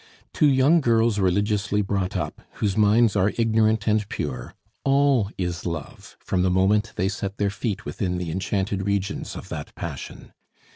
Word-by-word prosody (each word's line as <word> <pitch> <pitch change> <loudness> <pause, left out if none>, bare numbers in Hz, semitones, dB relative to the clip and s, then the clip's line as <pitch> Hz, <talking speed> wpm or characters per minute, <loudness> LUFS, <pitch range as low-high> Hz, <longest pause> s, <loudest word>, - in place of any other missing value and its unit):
To 150 - +4
young 140 +5 +4
girls 115 -4 +2
religiously 100 +2 +1
brought 95 -1 -1
up, 75 -4 -4
whose 100 -3 -1
minds 110 +1 +4
are 100 +1 +2
ignorant 110 -1 +2
and 105 -1 +1
pure, 65 -4 -5 0.3
all 135 -6 +3
is 90 -2 -3
love 85 -5 -6
from 90 - -1
the 90 - +2
moment 100 +4 +2
they 95 - 0
set 100 0 -4
their 100 -1 0
feet 105 0 -3
within 90 -2 -2
the 90 -2 -3
enchanted 95 +2 -2
regions 100 0 -2
of - - -9
that - - -7
passion. - - -7
100 Hz, 160 wpm, -24 LUFS, 95-110 Hz, 0.3 s, To